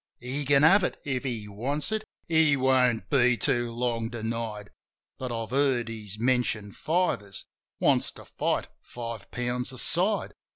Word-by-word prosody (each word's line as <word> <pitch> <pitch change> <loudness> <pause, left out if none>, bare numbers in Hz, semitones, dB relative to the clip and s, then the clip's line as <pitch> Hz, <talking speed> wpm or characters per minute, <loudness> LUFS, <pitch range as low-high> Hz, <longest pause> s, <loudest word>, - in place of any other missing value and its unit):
He 130 +4 -3
can 140 +1 +4
have 190 +5 +7
it - - -2
— - - -35
if 130 -2 -2
he 115 -6 -3
wants 135 - -2
it! 215 0 -1 0.2
He 160 -3 +4
won't 130 -3 +2
be 125 -3 +4
too 120 0 0
long 115 -1 -1
denied! 115 -3 -4 0.5
But 130 -1 -4
I've 115 -1 -4
heard 130 -4 +2
he's 105 -3 -7
mentioned 115 -4 0
fivers 150 - -1 0.2
— - - -61
wants - - +3
to - - -13
fight - - -1
five 115 -3 -7
pounds 125 +1 -2
a 130 - -6
side. 185 - +2
125 Hz, 165 wpm, -27 LUFS, 115-140 Hz, 0.5 s, have